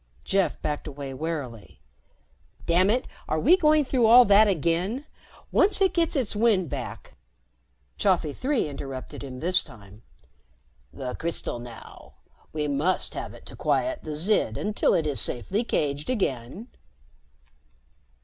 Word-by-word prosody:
Jeff 195 -1 0
backed 150 0 -3
away 140 -2 -7
warily. 135 -7 -6 0.9
"Damn 180 +3 +3
it, 245 +4 +1 0.2
are 155 - 0
we 315 - +6
going 305 -4 +3
through 250 -3 +2
all 245 +2 +8
that 205 +1 +6
again? 185 - 0 0.5
Once 390 +1 +4
it 385 -1 +3
gets 335 -2 +1
its 250 -7 -1
wind 205 -6 +2
back - - -6 0.4
" 60 +1 -43
Chafi 175 -7 +1
Three 265 - 0
interrupted 135 -2 -7
him 130 -2 -8
this 180 +3 +2
time. 105 -5 -15 0.9
"The 125 -2 -6
crystal 165 -7 -4
now. 120 -1 -12 0.4
We 150 -1 -2
must 145 +6 +1
have - - -6
it - - -15
to - - -10
quiet 320 -1 0
the 155 -1 -6
Zid 155 - +1
until 210 0 +1
it 160 - +1
is 145 -3 +1
safely 190 - -1
caged 145 - -2
again." 185 - -3
170 Hz, 140 wpm, -26 LUFS, 140-225 Hz, 0.9 s, all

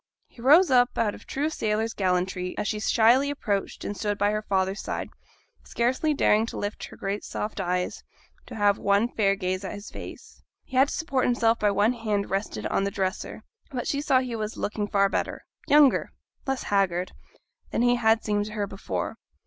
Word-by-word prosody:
He 235 - -16
rose 305 +7 +6
up 245 -1 +4
out 215 -3 +1
of - - -13
true 295 +3 -1
sailor's 220 -4 -1
gallantry, 180 -1 -1
as - - -2
she 215 - -1
shyly 235 +6 +4
approached 210 -9 -3
and 205 - -3
stood 205 -1 -2
by 205 +1 +2
her 215 0 -1
father's 195 -1 -1
side, - - -4 0.5
scarcely 255 +6 0
daring 225 -6 +3
to - - -6
lift 205 +1 -4
her - - -13
great 200 +1 -3
soft 210 0 -4
eyes, 180 -1 -2 0.4
to 245 - -8
have 205 -2 +2
one 200 +3 +3
fair 200 -5 +2
gaze 185 -1 -2
at 190 - -5
his 205 +1 -9
face. - - -10 0.2
He 260 - -10
had 265 +2 +5
to - - -4
support 275 -5 0
himself 235 -2 +2
by 210 - +3
one 205 +4 +2
hand 215 -4 -2
rested 195 - -2
on - - 0
the 200 - 0
dresser, 195 -1 -3 0.3
but 255 -5 -4
she 280 - 0
saw 260 -3 +3
he 250 -2 -4
was 215 0 -4
looking 205 0 -2
far 200 -1 +3
better 195 - -3 0.2
younger, 290 -2 +5 0.4
less 270 -1 -1
haggard 185 -3 0 0.6
than 235 - 0
he 245 0 +4
had 225 -1 +3
seemed 205 -1 0
to 210 - -8
her 210 -2 -1
before. 195 0 -4
210 Hz, 195 wpm, -26 LUFS, 200-245 Hz, 0.6 s, rose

